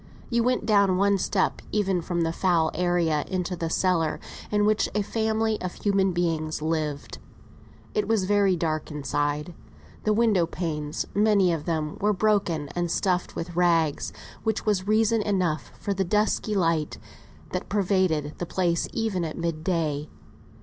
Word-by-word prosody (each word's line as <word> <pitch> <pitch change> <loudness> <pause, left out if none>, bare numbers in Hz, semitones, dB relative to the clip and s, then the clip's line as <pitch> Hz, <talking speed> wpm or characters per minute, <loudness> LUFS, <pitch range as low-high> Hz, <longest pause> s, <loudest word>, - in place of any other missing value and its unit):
You 235 0 +3
went 250 -1 +1
down 200 -4 +4
one 200 0 +3
step 190 +1 0
even 195 -4 +1
from 170 +1 -2
the 165 0 0
foul 170 -3 +2
area 170 -3 +1
into 180 -1 -2
the 165 -1 -3
cellar 165 -3 +1 0.3
in 210 0 +2
which 215 0 +2
a 210 - +2
family 220 0 0
of 180 -1 -4
human 195 -2 +1
beings 165 -3 -1
lived. 155 -2 -3 0.7
It 425 -2 0
was 220 -4 +2
very 200 -1 +3
dark 155 -2 -2
inside. 145 +2 -2 0.5
The 215 - +2
window 210 -6 +3
panes 155 -4 -3
were, 205 - +1
many 200 -5 +4
of 155 -2 -4
them, 155 -3 -2 0.2
broken 195 -8 +1
and 175 +2 -2
stuffed 180 +1 0
with 170 0 -5
rags, 165 -4 +2 0.3
which 220 -1 -1
was 200 -3 +1
reason 220 +1 +3
enough 180 - -1
for 200 - -1
the 195 0 0
dusky 210 +2 +1
light 165 -5 +1 0.5
that 180 - -4
pervaded 185 -7 +1
the 175 - -3
place 175 -2 0
even 220 -6 -1
at 160 -2 -4
mid 165 -2 -3
day. 155 -4 -1
180 Hz, 155 wpm, -26 LUFS, 160-205 Hz, 0.7 s, down